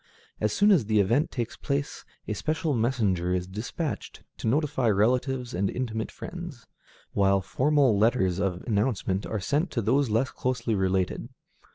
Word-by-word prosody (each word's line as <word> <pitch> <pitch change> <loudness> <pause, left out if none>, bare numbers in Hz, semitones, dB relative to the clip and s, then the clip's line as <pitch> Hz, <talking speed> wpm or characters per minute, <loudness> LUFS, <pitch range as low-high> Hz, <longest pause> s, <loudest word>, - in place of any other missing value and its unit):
As 105 - +1
soon 205 - +4
as 165 - +4
the 110 0 +2
event 115 +10 +2
takes 120 -3 -4
place, 140 0 -3 0.2
a 110 - -1
special 155 - -1
messenger 105 -8 +1
is 90 -1 -1
dispatched 110 - -5
to - - -4
notify 135 -1 +1
relatives 125 +4 +1
and 95 +2 0
intimate 110 -3 -3
friends, 175 -8 -8 0.5
while 100 -1 +3
formal 135 +3 +2
letters 100 -4 +2
of 95 -3 -1
announcement 105 -3 0
are 110 - -2
sent 145 - 0
to 120 - -1
those 130 +4 +2
less 115 +5 +1
closely 125 -3 -1
related. 95 -2 0
115 Hz, 155 wpm, -27 LUFS, 100-135 Hz, 0.5 s, soon